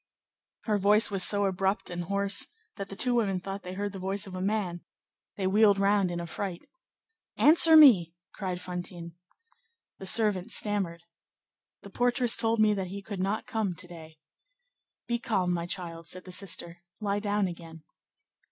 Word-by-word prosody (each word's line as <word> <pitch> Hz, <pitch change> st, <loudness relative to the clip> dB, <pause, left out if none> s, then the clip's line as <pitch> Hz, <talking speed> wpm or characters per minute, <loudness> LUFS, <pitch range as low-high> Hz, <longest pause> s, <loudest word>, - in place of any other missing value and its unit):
Her 210 Hz, -2 st, 0 dB
voice 210 Hz, +3 st, +4 dB
was 195 Hz, -2 st, 0 dB
so 205 Hz, +1 st, +3 dB
abrupt 190 Hz, 0 st, -1 dB
and 175 Hz, 0 st, -4 dB
hoarse 200 Hz, +1 st, +1 dB, 0.3 s
that 195 Hz, -1 st, -7 dB
the 195 Hz, -, -8 dB
two 250 Hz, +4 st, +2 dB
women 200 Hz, -6 st, 0 dB
thought 195 Hz, +2 st, -6 dB
they 180 Hz, 0 st, -8 dB
heard 205 Hz, +1 st, -3 dB
the 195 Hz, -, -7 dB
voice 195 Hz, +2 st, -2 dB
of 190 Hz, -2 st, -9 dB
a 185 Hz, -, -5 dB
man; 190 Hz, -4 st, -2 dB, 0.6 s
they 195 Hz, -, -2 dB
wheeled 205 Hz, +1 st, +4 dB
round 200 Hz, -1 st, +2 dB
in 175 Hz, 0 st, -4 dB
affright. 170 Hz, +1 st, -6 dB, 0.7 s
"Answer 320 Hz, +1 st, +6 dB
me!" 190 Hz, -, +7 dB, 0.2 s
cried 185 Hz, -3 st, -4 dB
Fantine. 175 Hz, -2 st, -7 dB, 0.9 s
The 190 Hz, -, -3 dB
servant 205 Hz, -1 st, +2 dB
stammered:— 200 Hz, -6 st, -1 dB, 0.8 s
"The 200 Hz, -, -12 dB
portress 245 Hz, +1 st, +1 dB
told 225 Hz, 0 st, +1 dB
me 215 Hz, -1 st, +4 dB
that 190 Hz, -2 st, -3 dB
he 200 Hz, +2 st, -8 dB
could 200 Hz, -1 st, -7 dB
not 195 Hz, +3 st, -2 dB
come 210 Hz, -5 st, -2 dB
to 185 Hz, +1 st, -5 dB
day." 160 Hz, -2 st, -12 dB, 0.9 s
"Be 235 Hz, 0 st, -2 dB
calm, 190 Hz, -7 st, 0 dB
my 170 Hz, 0 st, -3 dB
child," 165 Hz, -2 st, -5 dB
said 185 Hz, 0 st, -3 dB
the 185 Hz, -, -10 dB
sister; 175 Hz, -2 st, -3 dB, 0.2 s
"lie 205 Hz, -1 st, -1 dB
down 205 Hz, -1 st, 0 dB
again." 165 Hz, -2 st, -10 dB
195 Hz, 170 wpm, -28 LUFS, 180-210 Hz, 0.9 s, me